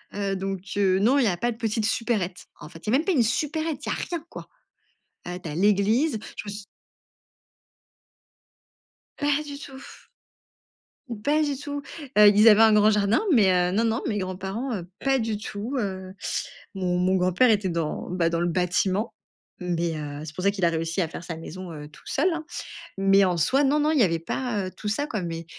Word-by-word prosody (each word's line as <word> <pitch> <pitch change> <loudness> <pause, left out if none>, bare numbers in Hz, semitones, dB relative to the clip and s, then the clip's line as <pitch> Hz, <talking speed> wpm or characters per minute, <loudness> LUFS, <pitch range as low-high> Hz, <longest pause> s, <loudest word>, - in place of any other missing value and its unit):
Heu, 200 -1 -1
donc 195 -1 -3 0.2
heu, 190 -2 +3
non, 245 +7 +4
il 270 - +4
y - - +3
a 175 -3 0
pas 240 +4 0
de 225 - -8
petites 220 -1 -1
supérettes. 205 -7 -1
En 150 - -10
fait, 165 +2 -13
il 215 - 0
y - - +1
a - - +6
même - - -1
pas 380 - +2
une 250 -6 +4
supérette, 305 +5 -1
il - - -3
y - - 0
a - - 0
rien, 340 -3 -4
quoi. - - -9 0.8
Heu, 180 0 -5
tu - - -7
as 150 - -5
l'église, 210 - +2 0.2
je - - -6
me - - -4
su 205 0 -8 2.5
Pas 290 0 +1
du 285 -1 -7
tout. 270 -2 -10 1.2
Mmh, 215 -3 -7
pas 305 +2 +2
du 290 -2 -1
tout. 285 +1 -5 0.3
Heu, 210 0 +9
ils 215 +2 +7
avaient 215 +1 +7
un 220 -1 +7
grand 210 0 +5
jardin, 210 - +2
mais 205 -7 +5
heu, 180 0 +2
non, 225 +4 +2
non, 225 +2 0
mes 210 -4 -1
grands 185 -1 -3
parents, 220 +7 -4
heu, 175 -3 -6 0.2
pas 270 -1 +3
du 225 -2 -1
tout, 215 +6 -5
heu, 190 -3 -4 0.6
mon 180 -2 -1
mon 185 +1 +2
grand-père 185 +7 +3
était 205 -3 +2
dans, 165 -3 -3
bah, 175 -2 +1
dans 170 0 -1
le 175 - +1
bâtiment, 185 +4 0 0.5
mais 170 -2 -1
heu, 145 -1 -6
c'est 155 0 -9
pour 185 - -5
ça 200 - +5
qu'il 195 -3 -2
a 170 - +4
réussi 165 +3 -2
à 165 - 0
faire 170 - -8
sa 165 -2 -5
maison, 175 +2 -8
heu, 150 -1 -8
tout 150 - -18
seul, 315 +7 +1
hein, 320 -1 -5 0.5
mais 195 0 +5
en 180 -2 0
soi, 265 - +3
non, 290 +2 +3
non, 305 +1 +2
il 300 - +2
y - - +6
avait 165 -3 +1
pas, 210 +2 -2
heu, - - -7
tout 210 - -7
ça, 285 +8 -1
quoi, 215 -9 -3
mais 165 -1 -5
200 Hz, 225 wpm, -25 LUFS, 180-245 Hz, 2.5 s, Heu